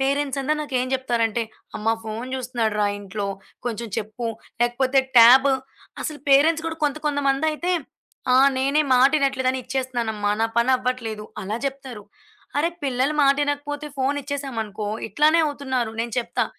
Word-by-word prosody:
Parents 275 0 0
అందరు 300 +3 0
నాకు 285 -3 -8
ఏం 255 - -1
చెప్తారంటే, 235 -3 0 0.3
"అమ్మ 215 +1 -2
ఫోను 220 +2 -5
జూస్తున్నాడురా! 230 -5 -1
ఇంట్లో 200 +1 -4 0.4
కొంచెం 235 -1 -3
చెప్పు" 220 +2 -4 0.3
లేకపోతే 255 +3 +2 0.2
ట్యాబ్ 250 +4 +8 0.5
అసలు 300 -1 -4
పేరెంట్స్ 310 +4 +4
కూడా 325 0 -3
కొంత 290 0 +1
కొంతమందయితే, 295 +4 0 0.6
"ఆ! - - +6 0.2
నేనే 275 +3 +2
మాట 255 +2 +6
ఇనట్లేదనిచ్చేస్తున్నానమ్మ. 255 -5 -1
నా 225 - +4
పనవ్వట్లేదు" 245 -3 0 0.2
అలా 205 +4 -3
జెప్తారు. 270 -5 -5 0.5
అరె! 330 +4 +2
పిల్లలు 265 +3 0
మాట 275 0 +5
వినకపోతే 290 +1 -3
ఫోనిచ్చేసామనుకో 265 -6 -3 0.2
ఇట్లానే 305 +6 +3
అవుతున్నారు 260 -5 -2
నేను 230 -1 -3
చెప్తా. 240 - -1
260 Hz, 125 wpm, -23 LUFS, 230-280 Hz, 0.6 s, ట్యాబ్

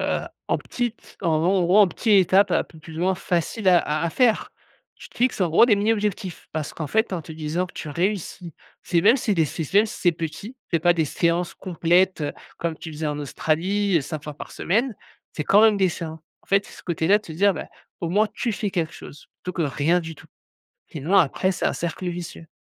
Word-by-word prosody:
heu, - - 0 0.3
en - - +1
petites 240 -2 -5
en 160 -2 +2
gros 185 +4 +2
en 180 - +2
gros, 180 +4 +4
en 205 -3 +7
petits 220 +4 0
étapes 190 +2 +4
un - - +2
peu 160 - -17
plus 160 0 -11
ou - - -1
moins 190 +1 +2
faciles 185 +3 -1
à 180 - +7
à 155 0 -1
à 170 - 0
faire! 235 +3 +2 0.5
Tu - - -12
te - - -22
fixes 250 -3 +1
en 180 - +3
gros 165 +8 +6
des 225 -4 +4
mini 210 +3 +2
objectifs 205 -4 -3
parce 155 -1 -3
qu'en 155 -3 -5
fait, 220 +4 +1
en 170 - -2
te 155 - -13
disant 160 +3 -2
que - - -16
tu - - -7
réussis 175 +1 -2 0.3
c'est 170 - +1
même 225 +8 +5
si 230 -5 0
des 165 -3 +3
c'est 160 +2 -4
s 150 - -8
même 210 +2 +6
si 220 - -8
c'est 175 -2 +4
petit, 165 +10 -6
c'est 170 - +2
pas 175 +1 +5
des 165 -2 +1
séances 170 +3 0
complètes 180 0 +1 0.4
comme 165 -1 -2
tu 160 - -8
faisais 155 +1 -4
en 150 0 -2
Australie, 170 +5 0
5 150 +1 -6
fois 150 - -6
par - - -9
semaine. 225 +5 0 0.4
C'est 150 - -4
quand 205 +6 +5
même 220 -2 +5
des 190 -2 +3
séan 160 -1 -6 0.2
en - - -29
fait, 195 +1 +2
ce - - -13
côté-là 170 +4 +2
de - - -19
te 165 - -9
dire: 195 +4 +3
«Bah, - - -6 0.3
au 170 - -2
moins 205 +5 +3
tu 240 - -1
fais 205 0 -2
quelque 165 -4 -2
chose, 150 - -12 0.2
plutôt 180 - -4
que 170 - -1
rien 150 +5 +1
du 165 -1 -7
tout». - - -16 0.6
Sinon 160 +6 0
après, 185 +2 +3
c'est - - -4
un - - +1
cercle 170 +2 -4
vicieux. 170 -1 -7
175 Hz, 240 wpm, -23 LUFS, 160-200 Hz, 0.6 s, en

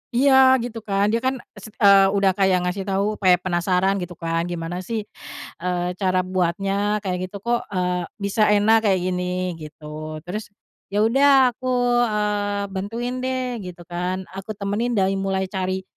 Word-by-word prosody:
Iya 265 0 +6
gitu 235 -2 -5
kan, 200 +1 +1
dia 230 - +1
kan 260 +1 0 0.2
s - - -12
eee, 200 -2 +5
udah 195 -1 +3
kayak 185 -1 +2
ngasih 190 +2 -3
tau, 200 +2 -1
kayak 180 -2 +4
penasaran 185 +2 +1
gitu 175 -1 -6
kan, 165 +1 -2
"Gimana 175 0 -4
sih, 215 +3 -4 0.6
eee, 180 0 -1
cara 185 -1 +2
buatnya?" 195 +3 -1
kayak 185 -1 -2
gitu. 200 - -8
"Kok 240 0 -1 0.5
bisa 205 +1 +1
enak 215 +1 +4
kayak 190 -2 +3
gini?" 180 0 -2
gitu, 155 0 -8
terus, 205 +5 -5 0.4
"Ya 205 +1 +2
udah 270 +2 +5
aku, 255 -1 -7 0.4
eee, 205 -1 -1
bantuin 230 +6 -4
deh," 255 -2 -2
gitu 180 -1 -9
kan. 180 +2 -3
Aku 195 +3 -7
temenin 210 +4 -2
dari 195 0 +2
mulai 195 0 -1
cari, 190 -1 -2
195 Hz, 160 wpm, -22 LUFS, 180-215 Hz, 0.6 s, Iya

